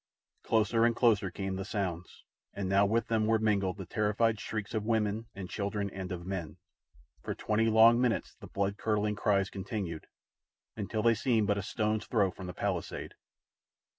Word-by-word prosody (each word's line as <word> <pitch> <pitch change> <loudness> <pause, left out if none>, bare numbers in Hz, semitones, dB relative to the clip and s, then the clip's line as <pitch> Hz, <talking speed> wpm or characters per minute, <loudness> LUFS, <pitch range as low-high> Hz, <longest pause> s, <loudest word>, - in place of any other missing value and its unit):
Closer 115 +1 +2
and 115 0 +3
closer 110 -6 +3
came 95 0 -4
the 95 - -3
sounds, 95 -4 -4 0.3
and 100 -1 -2
now 100 +1 +4
with 115 +3 +1
them 110 -1 +1
were 110 0 +4
mingled 100 -3 +1
the 95 - -6
terrified 110 +2 +1
shrieks 110 -1 -4
of 110 -2 -1
women 110 0 0
and 95 -2 -6
children 100 0 -3
and 95 0 -6
of 85 -1 -5
men. 95 -5 -5 0.6
For - - -4
twenty 110 +1 +1
long 115 +2 +6
minutes 125 -3 0
the - - -12
blood 100 +1 -1
curdling 105 -1 0
cries 100 -2 +1
continued, 95 -5 -5 0.7
until 110 +1 -3
they 115 0 +5
seemed 115 -2 +1
but 100 -1 +1
a - - -2
stone's 110 +2 -1
throw 100 -5 +2
from 95 - -9
the 90 - -5
palisade. - - -3
105 Hz, 175 wpm, -31 LUFS, 95-110 Hz, 0.7 s, long